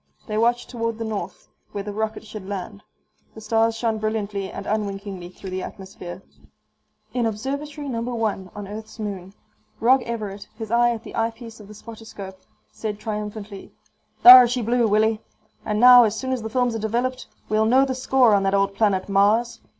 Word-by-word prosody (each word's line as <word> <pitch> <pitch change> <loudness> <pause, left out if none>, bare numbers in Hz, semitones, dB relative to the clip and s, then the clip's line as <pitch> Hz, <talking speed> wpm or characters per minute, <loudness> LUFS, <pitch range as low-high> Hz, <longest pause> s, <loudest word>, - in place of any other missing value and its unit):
They 215 - -4
watched 240 +1 +1
toward 230 -2 -3
the 230 - -4
north, 200 -4 -6 0.3
where 200 - -4
the 205 0 -6
rocket 220 +1 -3
should 210 -3 -9
land. 200 +1 -6 0.5
The - - -9
stars 225 +1 +1
shone 225 -2 -1
brilliantly 210 -2 -3
and 200 - -7
unwinkingly 200 -3 -4
through 185 +1 -10
the 185 0 -3
atmosphere. 190 -2 -9 0.9
In 240 -2 +1
Observatory 280 +7 -5
No. 235 -4 -3
1 225 -6 -2
on 205 -1 -7
Earth's 215 +2 -9
moon, 200 -3 -6 0.4
Rog 255 +3 +4
Everett, 210 -4 -6
his 220 -2 -7
eye 240 +1 +4
at 230 -2 -3
the - - -10
eyepiece 230 0 -4
of 210 - -13
the 210 - -12
spotter 225 +1 -11
scope, 190 -3 -10 0.3
said 215 -2 -5
triumphantly, 210 -1 -6 0.5
"Thar 250 0 +11
she 245 0 -2
blew, 235 +1 +2
Willie. 215 +1 +2 0.4
And 210 -1 -1
now, 245 0 +9
as 220 0 -1
soon 260 0 -3
as 255 -2 -1
the 220 - -5
films 245 +1 0
are 225 - -3
developed, 240 +4 -2 0.2
we'll 215 0 +2
know 260 +4 +4
the 265 - -2
score 260 -3 +3
on 200 - +4
that 195 0 +1
old 195 0 +1
planet 195 -3 +1
Mars." 205 +4 +2
220 Hz, 185 wpm, -23 LUFS, 200-235 Hz, 0.9 s, Thar